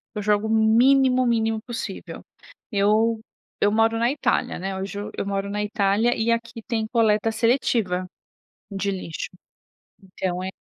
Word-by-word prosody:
eu 210 - -2
jogo 210 +1 +1
o - - -4
mínimo, 250 +4 +4
mínimo 225 -2 +1
possível. 240 +1 -7 0.5
Eu 215 +2 +2 0.4
eu 205 - +4
moro 225 +1 +2
na 235 +2 +2
Itália, 275 -3 0
né, 190 +1 -4
hoje 195 +1 -5 0.2
eu - - -2
moro 195 0 -2
na 205 +1 -2
Itália 210 +2 +1
e 225 +1 +1
aqui 230 -1 -3
tem 225 -3 -1
coleta 225 -2 +2
seletiva 220 -5 +1 0.6
de 200 -1 -2
lixo. 185 -4 -5 0.7
Então, 185 -1 -4
é 190 - -3
220 Hz, 145 wpm, -23 LUFS, 200-230 Hz, 0.7 s, mínimo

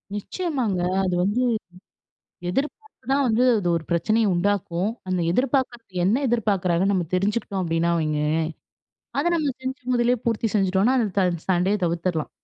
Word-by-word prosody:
நிச்சயமாங்க. 240 - -2 0.2
அது 180 -2 0
வந்து 215 +6 +1 1.1
எதிர்பார்ப்பு 295 - -4
தான் 280 0 +3
வந்து 235 +2 +2
அது 185 - -2
ஒரு 160 - -8
பிரச்சனைய 215 +7 +2
உண்டாக்கும். 190 0 0 0.2
அந்த 185 -1 0
எதிர்பார்க்கிறது 240 -5 -1
என்ன 235 +9 +2
எதிர்பார்க்கிறாங்கன்னு 200 -5 +1
நம்ம 175 -4 0
தெரிஞ்சுகுட்டோம் 200 0 -1
அப்பிடினா 170 0 +1
வைங்களேன்! 155 0 0 0.8
அத 290 - +1
நம்ம 295 -4 0
செஞ்சு 260 0 -5
முதலே 240 +1 +3
பூர்த்தி 225 -1 0
செஞ்சுட்டோன்னா 195 +6 +2
அந்த 220 -3 +1
த 185 - +3 0.2
சண்டைய 185 +4 +2
தவிர்த்துர்லாம். 170 -1 -1
205 Hz, 135 wpm, -24 LUFS, 180-240 Hz, 1.1 s, தான்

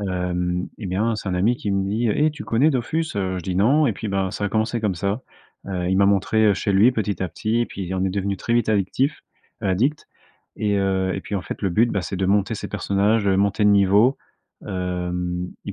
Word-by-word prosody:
Hem, 90 -2 -2
et 105 - -6
bien, 105 +5 0
c'est 105 - -5
un 90 - -1
ami 110 +7 +2
qui 105 - -4
me 95 0 +1
dit: 110 +4 0
«Eh, 155 +1 +3
tu 150 +1 -9
connais 135 +8 +3
Dofus?». 155 +2 -2
Heu, 95 -1 -1
je - - -7
dis: 90 +1 -3
«Non.», 140 +10 +4
et - - +1
puis, 110 - -6
ben, 95 -1 -1
ça 105 - -4
a - - +1
commencé 110 +2 0
comme 105 -4 0
ça. 100 +7 -2 0.4
Heu, 90 -2 -2
il 95 - +2
m'a 100 0 +4
montré 100 +1 +3
chez 100 - -1
lui, 105 +6 +5
petit 105 -5 -2
à 95 - -1
petit. 110 +7 -1
Et 120 - +1
puis, 95 -1 -6
on 95 0 0
est 95 - 0
devenu 100 0 -2
très 115 - -3
vite 120 -2 +1
addictifs 110 +8 0 0.4
addicts. 125 +11 0 0.5
Et 105 -1 0
heu, 95 -1 0
et - - -3
puis, 105 - -6
en 95 - -1
fait, - - -7
le 95 - +2
but, 115 +6 +3
bah 100 - 0
c'est 90 +4 -4
de 95 0 0
monter 100 +3 +2
ses - - -6
personnages, 100 +2 +1
heu, 95 -1 +3
monter 100 +1 +1
de 105 - +6
niveau. 100 +6 +4 0.5
Hem, 90 -1 -3 0.2
et 100 - -5
100 Hz, 240 wpm, -22 LUFS, 95-110 Hz, 0.5 s, de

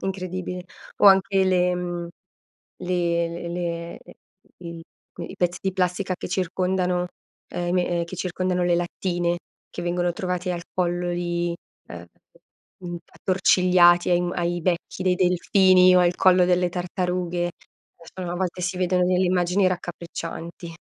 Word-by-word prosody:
Incredibile. 185 -1 -4 0.3
O - - +5
anche 195 0 +5
le 180 -1 +2
mhmm, 175 -1 -4 0.7
le 175 -2 0 0.2
l - - -5
le 170 -1 -4
le - - -15 0.4
il 170 -1 -8 0.4
i - - -7
pezzi 175 0 0
di 190 - -1
plastica 185 0 -1
che - - -6
circondano 180 0 0 0.5
uhm 175 - -2
i - - 0
me 180 0 +1
ehm 170 -1 0
che 170 +2 -8
circondano 180 0 -1
le 175 -1 +3
lattine, 175 0 -1 0.3
che - - -7
vengono 175 0 0
trovati 180 +1 -3
al 170 -1 -4
collo 175 -1 -1
di 175 0 -2 0.3
uhm 85 0 -9 0.7
mhmm 175 -1 -6
attorcigliati 180 -2 +3
ai 175 0 +2
ai 175 0 -1
becchi 175 +1 -2
dei 185 -1 +2
delfini 185 0 +4
o - - +6
al 175 0 +3
collo 180 -1 +5
delle 180 0 +2
tartarughe. 180 0 -2 0.6
A 180 -2 -4
volte 180 0 -3
si 185 +1 -2
vedono 180 0 +2
delle 185 +1 +2
immagini 180 +1 +2
raccapriccianti. 170 -1 -6
180 Hz, 145 wpm, -24 LUFS, 175-185 Hz, 0.7 s, o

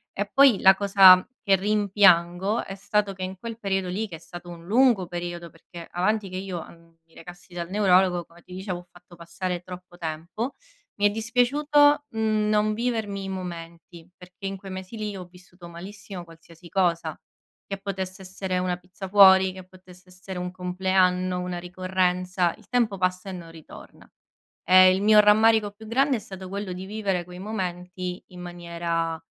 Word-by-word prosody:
E 205 +1 -2
poi 270 -5 +6
la 190 0 +7
cosa 195 -2 +7
che 195 -3 +3
rimpiango 195 -1 +2
è 195 - -7
stato 205 0 -1
che 185 -1 -7
in 185 +1 -5
quel 230 0 -7
periodo 195 -3 -1
lì, 210 +5 -3
che 175 - -9
è - - -19
stato 175 +1 -11
un 170 -1 -11
lungo 230 -4 +3
periodo, 175 0 -6
perché 165 +1 -12
avanti 200 +3 0
che 185 - -8
io, 185 -3 -5
ehm, 165 0 -19
mi 165 - -28
recassi 175 +1 -13
dal 170 -1 -5
neurologo, 185 -3 +3
come 170 +1 -20
ti 180 - -13
dicevo, 185 -1 -4
ho 175 - -16
fatto 175 0 -17
passare 170 +1 -5
troppo 180 -1 -11
tempo, 170 - -5 0.5
mi 205 - +5
è - - +2
dispiaciuto, 290 +7 +2
mhmm, 215 -1 0
non 215 0 +2
vivermi 220 -4 -2
i 195 - -5
momenti, 170 -2 -8
perché 180 +1 -13
in 195 0 -3
quei 195 0 -10
mesi 185 +3 -8
lì 210 -2 -4
ho 180 - -8
vissuto 180 0 -16
malissimo 185 +2 -9
qualsiasi 165 +1 -16
cosa, 170 -3 0 0.5
che 195 - -5
potesse 190 -1 -5
essere 185 0 -3
una 180 -1 -1
pizza 180 +2 -10
fuori, 190 -1 +7
che 185 0 -10
potesse 185 0 -18
essere 185 +1 -9
un 180 0 -4
compleanno, 185 0 0
una 180 0 -4
ricorrenza; 180 0 -1
il - - -21
tempo 235 -5 +1
passa 185 +1 -1
e - - -6
non 170 -2 -9
ritorna. 160 -2 -14 0.6
Ehm, 185 0 +8
il 190 - -2
mio 215 0 +7
rammarico 215 0 +4
più 220 +2 -14
grande 265 +4 +2
è - - -3
stato 190 -2 -9
quello 200 0 -5
di 185 +1 -7
vivere 195 -4 -2
quei 180 +1 -11
momenti 180 -2 -5
in 180 -1 -12
maniera, 170 -2 -4
185 Hz, 180 wpm, -25 LUFS, 175-205 Hz, 0.6 s, Ehm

